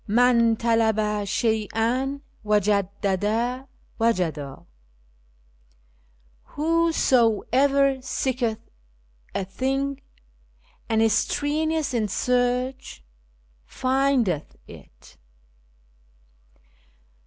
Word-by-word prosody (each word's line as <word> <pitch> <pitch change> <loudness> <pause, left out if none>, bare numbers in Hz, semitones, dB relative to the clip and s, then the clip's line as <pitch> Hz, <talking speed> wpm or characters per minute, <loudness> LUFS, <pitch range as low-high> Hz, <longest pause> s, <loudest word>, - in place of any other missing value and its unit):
" - - -31
Man 235 +1 +4
falaba 220 -2 +1
shcy'"", 230 +6 -1 0.2
wajadda 210 +4 0 0.3
ivajada." 165 -11 -1 1.8
"Whosoever 275 -4 +2
seeketh 255 -3 -1 0.8
a 195 - -1
thing, 270 +7 -2 0.9
and 225 0 +2
is 225 -2 +3
strenuous 310 +3 0
in 225 -3 0
search, 250 - -1 0.6
findeth 255 - 0
it." - - -16
235 Hz, 60 wpm, -24 LUFS, 210-265 Hz, 1.8 s, Man